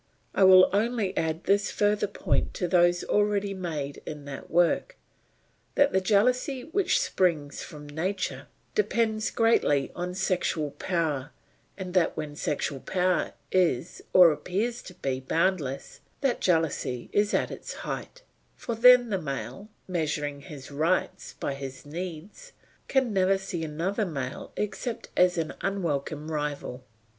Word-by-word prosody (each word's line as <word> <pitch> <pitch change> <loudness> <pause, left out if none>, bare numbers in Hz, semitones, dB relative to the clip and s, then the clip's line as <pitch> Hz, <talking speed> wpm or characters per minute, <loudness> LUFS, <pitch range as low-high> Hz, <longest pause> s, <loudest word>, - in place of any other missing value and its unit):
I - - +3
will 185 0 +9
only 215 -1 0
add 160 +1 -1
this 200 0 +2
further 205 0 +1
point 200 - -1
to 180 - -1
those 175 0 +3
already 205 -1 +1
made 155 -7 -4
in 150 -2 -7
that 140 -1 -8
work, 175 - +2 0.8
that 285 0 +4
the 190 - +3
jealousy 250 - +2
which 375 - +1
springs 170 - 0
from 150 -2 -9
nature 185 +6 -3 0.3
depends 225 - +1
greatly 150 - +2
on 180 +1 -4
sexual 180 -5 0
power, 150 -3 -1 0.5
and 185 -2 -6
that 180 -4 +2
when 150 -2 -4
sexual 145 -2 -2
power 180 +4 0 0.2
is 175 -5 +1
or 180 -3 +8
appears 215 +10 -2
to 185 - -10
be 135 -6 -2
boundless, 145 -1 -1 0.2
that 270 -4 +1
jealousy 160 -8 0
is 205 0 +2
at - - 0
its - - -7
height; - - -6 0.3
for 235 - -4
then 245 +1 +7
the 195 -2 0
male, 135 - -5 0.2
measuring 150 -5 -2
his 140 -1 -10
rights 160 +6 -1
by 140 - -2
his 135 -1 -8
needs, 180 - -7 0.3
can 260 -5 +1
never 190 0 +3
see 185 -3 -5
another 175 +7 -1
male 140 -4 -5
except 225 +3 -3
as 180 0 +4
an 160 -2 -2
unwelcome 155 -5 -2
rival. 145 -4 -3
180 Hz, 140 wpm, -27 LUFS, 150-205 Hz, 0.8 s, will